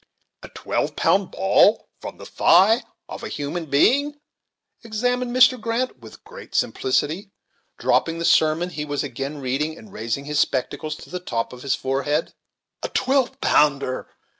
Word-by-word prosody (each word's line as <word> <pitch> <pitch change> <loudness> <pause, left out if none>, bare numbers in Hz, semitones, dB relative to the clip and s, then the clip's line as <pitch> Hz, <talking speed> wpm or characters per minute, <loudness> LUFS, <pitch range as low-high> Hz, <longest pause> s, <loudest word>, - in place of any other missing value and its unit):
"A - - -10
twelve - - -3
pound 195 -1 +2
ball 195 +3 +3
from - - -8
the - - -11
thigh 205 +8 +4 0.3
of - - -8
a - - -3
human 155 +3 -4
being:" 285 - +2 0.6
exclaimed 245 +3 -1
Mr. 255 0 +4
Grant, 230 +3 -2
with - - -14
great 475 +3 -12
simplicity, 200 - 0 0.5
dropping 165 0 +1
the 170 - -2
sermon 160 +3 +3
he 150 -1 -4
was 145 -1 -2
again 140 +2 -5
reading, 145 +4 -2
and 215 - -14
raising 115 +5 -3
his 150 0 -1
spectacles 145 +3 -1
to - - -13
the 180 - -3
top 120 -11 -3
of 125 - -11
his 140 - 0
forehead. 140 +4 -1 0.5
"A - - -3
twelve 260 -1 +1
pounder!" 140 -3 +2
165 Hz, 155 wpm, -22 LUFS, 145-230 Hz, 0.6 s, thigh